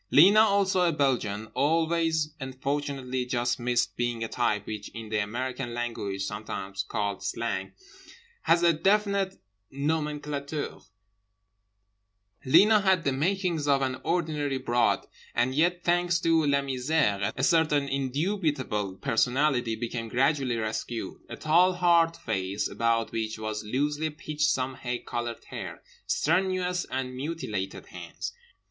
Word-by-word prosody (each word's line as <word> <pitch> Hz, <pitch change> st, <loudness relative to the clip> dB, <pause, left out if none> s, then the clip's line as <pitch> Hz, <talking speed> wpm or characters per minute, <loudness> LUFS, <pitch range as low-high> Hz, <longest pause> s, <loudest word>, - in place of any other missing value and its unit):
Lena, 195 Hz, +8 st, +7 dB
also 200 Hz, -3 st, +4 dB
a 175 Hz, -1 st, +4 dB
Belgian, 125 Hz, -8 st, 0 dB
always 160 Hz, 0 st, +1 dB
and 130 Hz, -1 st, -7 dB
fortunately 135 Hz, -2 st, -2 dB
just 120 Hz, 0 st, -1 dB
missed 120 Hz, 0 st, 0 dB
being 120 Hz, -1 st, -1 dB
a -, -, -2 dB
type 105 Hz, -4 st, 0 dB
which 105 Hz, -2 st, -6 dB
in 115 Hz, -2 st, -7 dB
the 110 Hz, -1 st, 0 dB
American 120 Hz, +3 st, -3 dB
language 105 Hz, -5 st, -3 dB
(sometimes 100 Hz, -2 st, -4 dB
called 100 Hz, 0 st, -3 dB
"Slang") 115 Hz, -5 st, -3 dB, 0.7 s
has 170 Hz, +1 st, +3 dB
a 170 Hz, -1 st, +6 dB
definite 200 Hz, +2 st, +1 dB, 0.3 s
nomenclature. 150 Hz, 0 st, -3 dB, 1.6 s
Lena 210 Hz, +11 st, +6 dB
had 190 Hz, -3 st, +3 dB
the 140 Hz, -, +1 dB
makings 170 Hz, +1 st, 0 dB
of 140 Hz, -1 st, +3 dB
an 130 Hz, -1 st, -1 dB
ordinary 155 Hz, -5 st, 0 dB
broad, 120 Hz, -2 st, +1 dB, 0.3 s
and 120 Hz, +2 st, +2 dB
yet, 175 Hz, +4 st, +2 dB
thanks 175 Hz, 0 st, +2 dB
to 165 Hz, -2 st, +3 dB
La 140 Hz, 0 st, +3 dB
Misère, 130 Hz, -7 st, 0 dB
a 130 Hz, -, -1 dB
certain 150 Hz, -3 st, +3 dB
indubitable 135 Hz, -, -1 dB
personality 125 Hz, +2 st, +1 dB
became 115 Hz, 0 st, -4 dB
gradually 135 Hz, 0 st, +1 dB
rescued. 110 Hz, +1 st, -3 dB
A -, -, -5 dB
tall 175 Hz, +4 st, +4 dB
hard 170 Hz, -2 st, +3 dB
face 95 Hz, -2 st, -2 dB
about 115 Hz, 0 st, 0 dB
which 110 Hz, -1 st, -3 dB
was 110 Hz, 0 st, -4 dB
loosely 145 Hz, +7 st, -1 dB
pitched 150 Hz, -2 st, -1 dB
some 130 Hz, 0 st, 0 dB
hay 125 Hz, -1 st, -3 dB
coloured 120 Hz, -1 st, -5 dB
hair. -, -, -6 dB, 0.2 s
Strenuous 180 Hz, -1 st, +1 dB
and 130 Hz, -1 st, -4 dB
mutilated 125 Hz, -, -4 dB
hands. -, -, -7 dB
135 Hz, 130 wpm, -28 LUFS, 120-165 Hz, 1.6 s, Lena